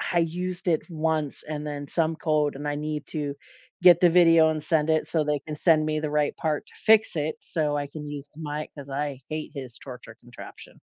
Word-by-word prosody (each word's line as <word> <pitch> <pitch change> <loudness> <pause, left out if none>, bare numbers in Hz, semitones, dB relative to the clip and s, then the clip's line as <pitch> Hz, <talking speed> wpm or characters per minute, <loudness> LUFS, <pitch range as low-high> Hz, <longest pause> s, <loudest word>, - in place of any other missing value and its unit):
I 175 - +3
used 180 +3 -3
it 165 -2 +2
once 155 -2 -1
and 150 -1 -4
then 145 -1 -5
some 160 -1 0
code, 150 -3 +1
and 145 +1 -4
I 145 - -1
need 150 0 -4
to 145 -3 -3 0.5
get 180 -1 +8
the 175 -2 +6
video 165 -2 +6
and 155 -1 -3
send 160 0 +1
it, 155 - +1
so 155 -3 +1
they 150 -1 0
can 150 +1 -7
send 155 -1 +3
me 155 0 0
the 150 -1 -2
right 150 -1 0
part 155 -2 -2
to - - -16
fix 220 -4 +5
it, 155 +1 -1
so 150 -3 -1
I 145 - -2
can 150 0 -8
use 145 -1 -7
my 150 -1 -4
'cause 140 -1 -9
I 140 -1 -3
hate 155 -1 -4
his 130 -4 -8
torture 125 -4 -11
contraption. 120 0 -12
155 Hz, 220 wpm, -26 LUFS, 145-160 Hz, 0.5 s, get